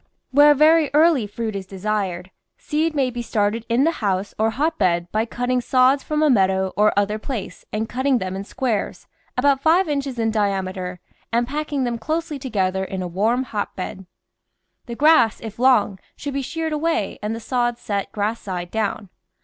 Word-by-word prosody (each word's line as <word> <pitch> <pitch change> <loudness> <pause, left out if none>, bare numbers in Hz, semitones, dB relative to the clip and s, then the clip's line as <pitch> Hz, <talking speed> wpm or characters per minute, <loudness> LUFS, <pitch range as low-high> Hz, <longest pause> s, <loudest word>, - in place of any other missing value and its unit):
Where 290 +2 +7
very 310 +1 +5
early 305 -8 +4
fruit 220 +1 -4
is 195 -1 -5
desired, 190 -2 -3 0.3
THE - - -33
VEGETABLE - - -23
GARDEN 315 +2 +2
seed - - -14
may 270 -3 +2
be 240 0 -4
started 220 0 -1
in 235 +3 +3
the 325 - +3
house 195 -1 -1
or 220 +1 +3
hotbed 205 - 0
by 220 +1 +1
cut 245 +2 -4
ting 250 0 +1
sods 255 +2 +3
from 305 +2 -1
a 305 - +4
meadow 190 -3 +2
or 210 +2 +4
other 205 +1 +1
place 230 -3 -6
and 220 +1 -2
cutting 260 +2 +1
them 185 -4 -4
in 195 - -4
squares 230 -1 -3 0.3
about 275 +1 +3
five 335 +5 +4
inches 280 -3 -2
in 225 -1 +1
diameter 190 -3 -2 0.3
and 235 +1 +1
packing 290 0 -2
them 240 -2 -2
closely 315 +4 -3
together 190 -7 -1
in 190 -1 -4
a - - -3
warm 220 +8 +1
hotbed. 190 -5 -5 0.8
The 235 - -5
grass, 295 -6 +4
if 220 0 -9
long, 245 -6 +3 0.2
should 285 -1 -5
be 275 - -1
sheared 320 +3 -3
away 330 +2 -1
and 210 +2 -2
the - - -6
sods 240 0 -1
set 200 -2 -3
grass 215 +2 -2
side 180 -3 -5
down. 215 -2 -2
230 Hz, 190 wpm, -22 LUFS, 200-275 Hz, 0.8 s, Where